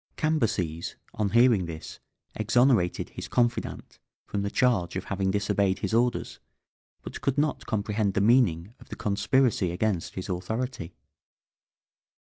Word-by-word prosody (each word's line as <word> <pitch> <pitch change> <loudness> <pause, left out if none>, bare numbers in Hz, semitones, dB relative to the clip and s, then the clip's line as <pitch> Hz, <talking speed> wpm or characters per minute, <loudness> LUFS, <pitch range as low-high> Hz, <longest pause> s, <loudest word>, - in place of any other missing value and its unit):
Cambyses, 105 - -1 0.2
on 105 -2 -1
hearing 115 -5 +4
this, 80 -1 -8 0.3
exonerated 115 -4 +2
his - - -7
confidant 120 -1 -1 0.3
from 100 - -3
the 100 - -1
charge 105 -8 +1
of 95 - -2
having 95 -1 -1
disobeyed 100 -1 +1
his - - -3
orders, 120 +1 0 0.6
but - - -8
could 140 0 0
not 150 +1 0
comprehend 105 -1 -1
the - - +3
meaning 105 -5 +3
of - - -17
the - - -6
conspiracy 105 -1 +1
against 90 0 -2
his 95 - -5
authority. 95 +1 -4
105 Hz, 135 wpm, -27 LUFS, 95-120 Hz, 0.6 s, hearing